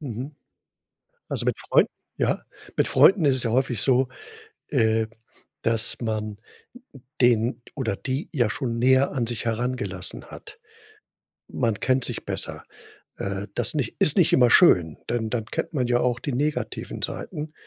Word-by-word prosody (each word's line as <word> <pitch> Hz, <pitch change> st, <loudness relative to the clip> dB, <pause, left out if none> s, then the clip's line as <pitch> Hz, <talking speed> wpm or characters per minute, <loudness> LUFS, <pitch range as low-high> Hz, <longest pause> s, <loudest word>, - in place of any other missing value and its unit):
Mhm. 135 Hz, +1 st, -6 dB, 0.9 s
Also, -, -, -2 dB
mit -, -, 0 dB
Freunden -, -, +2 dB, 0.3 s
Ja, -, -, 0 dB, 0.3 s
mit -, -, +3 dB
Freunden 190 Hz, -5 st, +6 dB
ist 135 Hz, -1 st, +4 dB
es 125 Hz, -, +2 dB
ja 115 Hz, -, 0 dB
häufig 125 Hz, -2 st, +1 dB
so, 130 Hz, -1 st, +3 dB, 0.6 s
äh, 110 Hz, -4 st, +2 dB, 0.5 s
dass 115 Hz, 0 st, +2 dB
man 110 Hz, -2 st, -3 dB, 0.8 s
den 120 Hz, 0 st, +3 dB
oder 120 Hz, -8 st, -1 dB
die 135 Hz, -, -4 dB
ja 120 Hz, -7 st, +2 dB
schon 115 Hz, -2 st, -2 dB
näher 130 Hz, +2 st, +4 dB
an 125 Hz, -4 st, 0 dB
sich 120 Hz, 0 st, -3 dB
herangelassen 115 Hz, -6 st, -3 dB
hat. 425 Hz, +1 st, -12 dB, 0.9 s
Man 115 Hz, -5 st, -1 dB
kennt 130 Hz, -1 st, +1 dB
sich -, -, -5 dB
besser. -, -, -4 dB, 0.5 s
Äh, 100 Hz, +1 st, -4 dB
das -, -, -1 dB
nicht 135 Hz, -6 st, -2 dB
ist 155 Hz, -, +3 dB
nicht 175 Hz, -, +4 dB
immer 125 Hz, -2 st, +6 dB
schön, 85 Hz, -, +5 dB
denn 115 Hz, -2 st, -1 dB
dann 115 Hz, -2 st, -2 dB
kennt 165 Hz, +5 st, -4 dB
man 125 Hz, -4 st, 0 dB
ja 120 Hz, 0 st, +2 dB
auch 125 Hz, -1 st, 0 dB
die 140 Hz, +1 st, -4 dB
negativen 150 Hz, +4 st, -2 dB
Seiten. 150 Hz, +1 st, -5 dB
120 Hz, 155 wpm, -24 LUFS, 110-135 Hz, 0.9 s, Freunden